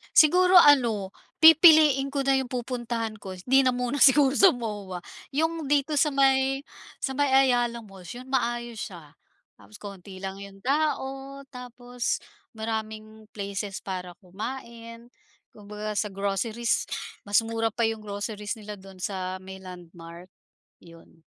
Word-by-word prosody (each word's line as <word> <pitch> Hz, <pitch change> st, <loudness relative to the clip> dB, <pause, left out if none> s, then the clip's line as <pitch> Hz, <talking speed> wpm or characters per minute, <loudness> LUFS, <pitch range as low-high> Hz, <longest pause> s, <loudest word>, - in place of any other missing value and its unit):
Siguro 360 Hz, +4 st, +6 dB
ano, 235 Hz, -, +5 dB, 0.3 s
pipiliin 315 Hz, -4 st, +7 dB
ko 275 Hz, -1 st, -2 dB
na 270 Hz, -1 st, +3 dB
yung 260 Hz, -2 st, -4 dB
pupuntahan 240 Hz, -3 st, -3 dB
ko. 190 Hz, -, -7 dB
'Di 260 Hz, +9 st, +3 dB
na 260 Hz, -, +3 dB
muna 250 Hz, +3 st, -2 dB
siguro 270 Hz, 0 st, +6 dB
sa 385 Hz, +6 st, +6 dB
MOA, 205 Hz, -, -5 dB, 0.4 s
yung 320 Hz, 0 st, -1 dB
dito 290 Hz, +1 st, +1 dB
sa 300 Hz, -, +3 dB
may 270 Hz, -1 st, +2 dB, 0.4 s
sa 265 Hz, -, -3 dB
may 285 Hz, +1 st, +1 dB
Ayala 245 Hz, -3 st, +3 dB
Malls, 190 Hz, -1 st, -11 dB
yun, 250 Hz, -, -10 dB
maayos 240 Hz, -3 st, -2 dB
siya. 165 Hz, -6 st, -9 dB, 0.5 s
Tapos 215 Hz, -, -17 dB
konti 195 Hz, -2 st, -10 dB
lang 195 Hz, 0 st, -5 dB
yung 195 Hz, 0 st, -12 dB
tao, 275 Hz, -1 st, -2 dB
tapos 245 Hz, -1 st, -4 dB, 0.4 s
maraming 220 Hz, -1 st, -6 dB
places 200 Hz, -1 st, -5 dB
para 180 Hz, -2 st, -6 dB
kumain, 230 Hz, +3 st, -8 dB, 0.4 s
kumbaga 210 Hz, 0 st, -7 dB
sa 210 Hz, -, -1 dB
groceries, 210 Hz, +4 st, -1 dB, 0.4 s
mas 205 Hz, -, +2 dB
mura 225 Hz, 0 st, -1 dB
pa 230 Hz, +2 st, -2 dB
yung 225 Hz, 0 st, -2 dB
groceries 210 Hz, +1 st, -5 dB
nila 210 Hz, -2 st, -9 dB
doon 195 Hz, 0 st, -14 dB
sa 185 Hz, -1 st, -4 dB
may 190 Hz, 0 st, -9 dB
Landmark, 175 Hz, -1 st, -12 dB, 0.5 s
'yon. 165 Hz, -1 st, -18 dB
230 Hz, 140 wpm, -26 LUFS, 200-270 Hz, 0.5 s, pipiliin